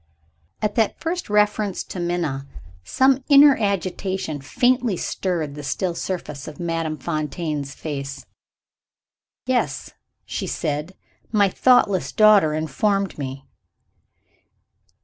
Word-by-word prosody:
At 210 -1 +1
that 220 -1 +1
first 345 -2 -3
reference 210 -1 +1
to 185 - -7
Minna, 170 -6 -2 0.4
some 260 - +2
inner 285 -1 +8
agitation 190 -6 -2
faintly 245 - +1
stirred 165 -7 -2
the 150 - -7
still 170 +6 -2
surface 170 -6 -5
of 150 - -9
Madame 165 -2 -2
Fontaine's 150 -1 -3
face. 140 -2 -6 1.2
"Yes," - - -1 0.3
she - - -4
said. 150 +5 -3 0.4
"My 205 -3 +4
thoughtless 205 -4 +3
daughter 205 -8 +5
informed 195 +5 -1
me." 135 0 -6
175 Hz, 105 wpm, -22 LUFS, 150-210 Hz, 1.2 s, inner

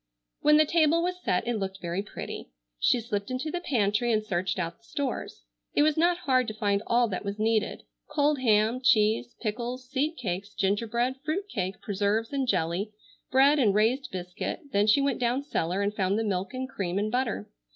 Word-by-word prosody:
When 300 0 +5
the 310 - +6
table 330 +1 +3
was 360 0 -2
set 180 - 0
it 240 -3 0
looked 195 0 -4
very 175 +1 -2
pretty. 205 - -7 0.3
She 245 - +3
slipped 210 -2 -3
into 255 +5 -3
the 355 - -2
pantry 230 - +1
and 215 -1 +1
searched 185 -2 -1
out 170 0 -3
the - - -33
stores. 275 +4 -4 0.3
It 290 - +5
was 305 -1 +3
not 345 +2 +3
hard 255 -3 +3
to 215 - -4
find 205 -2 +1
all 240 0 +3
that 185 - -3
was 200 0 -4
needed; 220 0 0 0.2
cold 295 -1 +1
ham, 225 0 +3
cheese, 215 +1 +3
pickles, 240 +3 -3
seed 295 +5 -1
cakes, 200 -2 -4
gingerbread, 230 +6 0
fruit 325 +7 -2
cake, 190 - -3
preserves 210 +4 0
and 270 -2 0
jelly, 180 +1 0 0.4
bread 275 +3 +5
and 210 -7 +3
raised 235 +6 +2
biscuit, 180 - -4
then 205 -2 +2
she 250 +6 +5
went 275 -2 0
down 250 +3 +1
cellar 190 - -1
and 205 +1 0
found 195 0 +1
the 225 - 0
milk 195 -3 -1
and 260 0 -4
cream 190 -7 -3
and 210 +1 0
butter. 240 - -1
225 Hz, 195 wpm, -28 LUFS, 200-265 Hz, 0.4 s, the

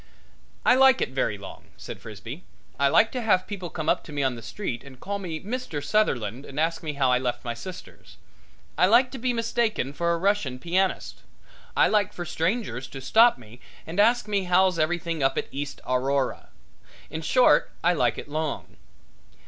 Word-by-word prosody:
"I - - +7
like 265 0 +6
it - - 0
very 130 -5 -1
long," 100 - -11
said - - -8
Frisbee. 115 - -9 0.4
"I 140 - +4
like 220 +10 +4
to 250 - -3
have 200 -5 +2
people 190 -4 -6
come 160 0 -5
up - - +2
to - - -10
me 145 -1 -1
on 130 -1 +1
the 115 - -9
street 120 - -5
and 135 -2 -13
call 200 0 -4
me 170 -5 -5
Mr. 210 - -4
Sutherland 135 - 0
and 140 0 -7
ask 165 +1 0
me 155 -2 -4
how 135 -3 +2
I 125 - +3
left 125 -1 -3
my 120 - -2
sisters? 120 - -11 0.6
I 180 - +6
like 245 +5 +5
to 265 - -7
be 250 +1 0
mistaken 230 - -1
for 170 +2 0
a 170 - +1
Russian 185 -8 0
pianist. 185 +6 -1 0.6
I - - +6
like 210 -1 +1
for 175 - -5
strangers 165 - -2
to 135 - -9
stop 225 - +5
me 120 0 -15 0.3
and 170 +5 -5
ask 230 +1 +4
me 200 -2 0
how's 180 -1 +3
everything 165 0 -1
up 135 - +1
at - - 0
East 140 +1 -5
Aurora. 130 +1 0 0.6
In 160 - -4
short, 250 - +4
I 175 +1 +4
like 170 - +1
it - - -7
long." 155 0 -4
165 Hz, 195 wpm, -26 LUFS, 135-205 Hz, 0.6 s, I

